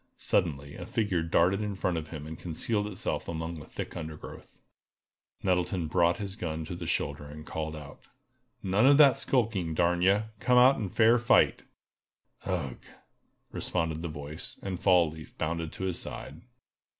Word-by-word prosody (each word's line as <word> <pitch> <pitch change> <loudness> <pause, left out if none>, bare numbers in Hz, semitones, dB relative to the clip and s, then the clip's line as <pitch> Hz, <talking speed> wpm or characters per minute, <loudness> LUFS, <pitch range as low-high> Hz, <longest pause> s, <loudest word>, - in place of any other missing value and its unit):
Suddenly 70 -4 0
a 90 -1 -8
figure 105 -8 0
darted 85 +4 +2
in 105 -2 -3
front 95 -2 -1
of 80 -1 -3
him 75 -2 -7
and 80 +1 -8
concealed 105 +5 -1
itself 100 -3 -3
among 80 0 -4
the 75 - -11
thick - - -6
undergrowth. 80 -2 -9 0.8
Nettleton 90 -1 +1
brought 85 +2 +2
his 100 -2 -5
gun 80 -5 -4
to 90 - -6
the - - -6
shoulder, 75 - -1
and 75 +1 -10
called 80 -1 -4
out: 75 -2 -11 0.6
"None 100 +6 +3
of 140 0 +7
that 140 -3 +7
skulking, 110 - 0
darn 85 +1 +2
ye! 100 +3 +4 0.2
Come 125 0 +3
out 130 +2 +7
and 100 -5 -3
fight 115 +1 +4 0.7
fair!" - - -5
"Ugh!" 70 -9 -2 0.7
responded 80 -1 -2
the 85 - -3
voice, 75 0 -7
and 95 -3 -3
Fall 90 -4 +4
leaf 80 -1 -12
bounded 80 0 -2
to - - -6
his 95 -2 -1
side. 75 +3 -7
85 Hz, 165 wpm, -29 LUFS, 80-100 Hz, 0.8 s, of